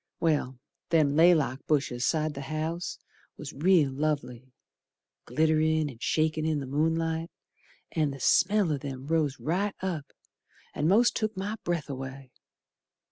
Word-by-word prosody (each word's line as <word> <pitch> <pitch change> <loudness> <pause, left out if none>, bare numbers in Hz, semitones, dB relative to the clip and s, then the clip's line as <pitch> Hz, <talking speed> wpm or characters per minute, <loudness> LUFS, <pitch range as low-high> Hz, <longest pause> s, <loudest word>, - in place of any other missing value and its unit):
Well, 145 -6 0 0.3
them 155 -4 +3
laylock 155 -5 +4
bushes 135 -4 +1
side 155 -2 0
o' 140 - -5
th' - - -7
house 155 +4 -3 0.4
Was 150 -1 -8
real 155 -2 +3
lovely. 135 -4 -3 0.8
Glitt'rin' 155 +2 +2
and 115 -2 -16
shakin' 155 +6 +1
in 155 -1 0
the 140 - -5
moonlight, 160 +3 0 0.6
An' 155 -3 +1
the 135 0 -7
smell 185 +6 +3
o' 145 - -2
them 135 -1 -7
rose 150 -3 0
right 195 +6 -1
up 170 -7 -3 0.7
An' 150 - 0
most 225 +7 +4
took 215 -2 -2
my 205 +3 -3
breath 170 -4 -2
away. 135 -1 -7
155 Hz, 140 wpm, -28 LUFS, 140-165 Hz, 0.8 s, laylock